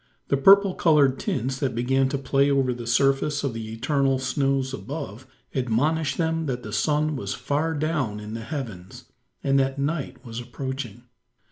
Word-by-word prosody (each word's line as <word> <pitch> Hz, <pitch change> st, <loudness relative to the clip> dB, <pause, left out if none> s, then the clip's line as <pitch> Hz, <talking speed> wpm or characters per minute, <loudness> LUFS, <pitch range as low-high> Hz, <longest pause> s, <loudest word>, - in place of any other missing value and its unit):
The -, -, +3 dB
purple 195 Hz, +6 st, +6 dB
coloured 145 Hz, -7 st, +3 dB
tints, 130 Hz, +3 st, -2 dB
that 135 Hz, -5 st, -1 dB
began 130 Hz, +3 st, +2 dB
to 140 Hz, -, -1 dB
play 140 Hz, +1 st, +2 dB
over 135 Hz, -2 st, +2 dB
the 120 Hz, -1 st, -7 dB
surface 135 Hz, +4 st, +2 dB
of 135 Hz, -4 st, -1 dB
the 110 Hz, -1 st, -6 dB
eternal 135 Hz, +3 st, +1 dB
snows 135 Hz, 0 st, 0 dB
above, 135 Hz, -4 st, -6 dB, 0.3 s
admonished 140 Hz, +5 st, 0 dB
them 160 Hz, -1 st, 0 dB
that 125 Hz, -2 st, -3 dB
the 105 Hz, -, -7 dB
sun 150 Hz, +8 st, +1 dB
was 100 Hz, -7 st, -3 dB
far 155 Hz, +3 st, -1 dB
down 145 Hz, -8 st, -1 dB
in 105 Hz, +1 st, -7 dB
the 115 Hz, -, -4 dB
heavens, 110 Hz, -, -7 dB, 0.4 s
and 135 Hz, 0 st, +3 dB
that 135 Hz, 0 st, 0 dB
night 140 Hz, -2 st, -3 dB
was 115 Hz, 0 st, -6 dB
approaching. 125 Hz, -1 st, -6 dB
135 Hz, 165 wpm, -25 LUFS, 120-145 Hz, 0.4 s, purple